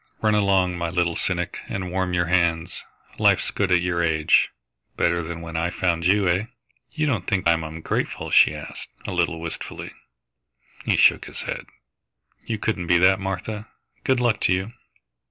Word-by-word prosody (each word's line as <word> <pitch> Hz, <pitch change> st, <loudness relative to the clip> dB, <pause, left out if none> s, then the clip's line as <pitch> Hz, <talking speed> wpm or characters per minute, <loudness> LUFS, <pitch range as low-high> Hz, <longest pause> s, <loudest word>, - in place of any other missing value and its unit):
Run 110 Hz, -1 st, +3 dB
along, 95 Hz, -4 st, +2 dB
my 85 Hz, 0 st, -1 dB
little 85 Hz, -1 st, 0 dB
cynic, 90 Hz, -2 st, -2 dB
and 95 Hz, -2 st, -4 dB
warm 95 Hz, 0 st, -1 dB
your 85 Hz, 0 st, +2 dB
hands. 85 Hz, -1 st, 0 dB, 0.4 s
Life's -, -, +3 dB
good 100 Hz, -2 st, -1 dB
at 90 Hz, -1 st, +4 dB
your 85 Hz, -1 st, 0 dB
age 80 Hz, -2 st, +3 dB, 0.5 s
better 85 Hz, 0 st, +2 dB
than 85 Hz, 0 st, -6 dB
when 85 Hz, -1 st, -8 dB
I 85 Hz, +2 st, 0 dB
found 85 Hz, -2 st, 0 dB
you, 100 Hz, 0 st, +3 dB
eh?" 90 Hz, +4 st, +1 dB, 0.5 s
"You 155 Hz, 0 st, -1 dB
don't 115 Hz, -11 st, -1 dB
think 95 Hz, -3 st, +1 dB
I -, -, +6 dB
am 80 Hz, -1 st, -2 dB
ungrateful?" 80 Hz, +1 st, -3 dB
she -, -, +6 dB
asked, -, -, -8 dB, 0.2 s
a -, -, -3 dB
little 85 Hz, -2 st, 0 dB
wistfully. 85 Hz, -1 st, -6 dB, 0.9 s
He -, -, +2 dB
shook -, -, +5 dB
his -, -, -7 dB
head. -, -, -5 dB, 0.8 s
"You 110 Hz, -, -3 dB
couldn't 100 Hz, -5 st, -2 dB
be 85 Hz, -, +5 dB
that, 95 Hz, +2 st, +5 dB
Martha.... 100 Hz, +3 st, -4 dB, 0.4 s
Good 130 Hz, -1 st, +2 dB
luck 120 Hz, -3 st, +2 dB
to -, -, +3 dB
you!" 95 Hz, +5 st, -2 dB
90 Hz, 175 wpm, -23 LUFS, 85-95 Hz, 0.9 s, I